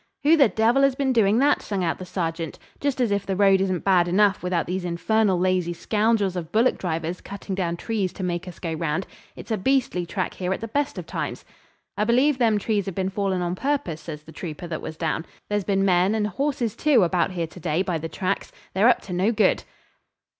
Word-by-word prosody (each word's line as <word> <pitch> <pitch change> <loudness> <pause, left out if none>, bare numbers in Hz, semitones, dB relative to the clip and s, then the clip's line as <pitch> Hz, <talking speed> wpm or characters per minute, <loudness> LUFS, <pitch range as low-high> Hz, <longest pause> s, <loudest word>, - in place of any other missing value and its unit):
'Who 310 +3 +6
the 280 -7 +5
devil 225 +7 +3
has 275 -1 +4
been 265 -1 +1
doing 215 -2 +4
that?' 285 +3 +3
sung 200 -3 -2
out 165 - -1
the 185 - -7
sergeant. 165 -3 -3 0.2
'Just 280 -2 -1
as 240 -4 +2
if 200 -1 +1
the 195 - -2
road 195 -1 +4
isn't 185 -3 -1
bad 180 -3 +4
enough 200 +3 +3
without 180 -2 0
these 185 +1 -3
infernal 190 +3 +1
lazy 180 -1 +1
scoundrels 210 +1 +1
of 170 -3 -5
bullock 230 +4 +2
drivers 165 0 -3
cutting 200 0 -7
down 175 -3 -1
trees 205 -2 -2
to 190 - -6
make 175 0 -2
us 180 - -9
go 165 -2 -4
round. 160 +2 -1 0.3
It's - - -9
a 220 - 0
beastly 215 -6 +1
track 185 +2 -2
here 180 0 -3
at - - -4
the 225 - -4
best 285 +5 -1
of - - -5
times.' - - -4 0.5
'I 210 - +2
believe 255 +4 +3
them 225 -3 +3
trees 205 -1 -1
have 190 - -4
been 190 -1 -1
fallen 190 -2 -1
on 175 0 -1
purpose,' 265 - -2
says 150 -2 -8
the 160 - -13
trooper 160 +1 -7
that 165 -2 -4
was 155 - -7
down. 160 -1 -1 0.3
'There's 205 -2 0
been 195 -1 +1
men, 185 +2 +3
and 215 -1 +1
horses 265 -1 -1
too, 280 -9 +4
about 175 +1 +1
here 170 -2 -1
to 165 +3 -12
day, 160 +2 0
by 180 -4 -2
the 165 +1 -5
tracks. 195 +2 -2 0.2
They're 205 +6 +5
up 245 - +3
to 185 - -7
no 190 +5 +2
good!' 215 -2 +2
190 Hz, 230 wpm, -24 LUFS, 175-220 Hz, 0.5 s, Who